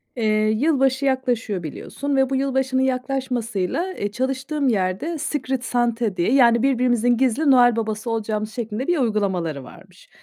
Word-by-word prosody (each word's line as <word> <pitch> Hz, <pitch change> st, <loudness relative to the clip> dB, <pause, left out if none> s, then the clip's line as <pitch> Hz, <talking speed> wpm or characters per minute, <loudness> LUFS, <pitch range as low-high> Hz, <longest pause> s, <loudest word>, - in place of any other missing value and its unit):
Eee, 230 Hz, -, -2 dB, 0.2 s
yılbaşı 270 Hz, +2 st, +1 dB
yaklaşıyor 245 Hz, -8 st, -1 dB
biliyorsun 280 Hz, -, -4 dB
ve 265 Hz, -1 st, +2 dB
bu 270 Hz, -, -1 dB
yılbaşının 265 Hz, -1 st, 0 dB
yaklaşmasıyla, 255 Hz, -, -2 dB
eee, 205 Hz, 0 st, -4 dB
çalıştığım 270 Hz, +4 st, -2 dB
yerde 205 Hz, -, -1 dB
Secret 265 Hz, -4 st, -3 dB
Santa 235 Hz, -4 st, 0 dB
diye, 175 Hz, +7 st, +1 dB
yani 235 Hz, -3 st, +5 dB
birbirimizin 245 Hz, -2 st, +2 dB
gizli 265 Hz, +4 st, +2 dB
Noel 245 Hz, -2 st, +5 dB
Baba'sı 220 Hz, 0 st, -3 dB
olacağımız 215 Hz, -1 st, -2 dB
şeklinde 235 Hz, +3 st, -4 dB
bir 350 Hz, -, +2 dB
uygulamaları 190 Hz, -, -1 dB
varmış. -, -, -16 dB
245 Hz, 140 wpm, -22 LUFS, 220-270 Hz, 0.2 s, yani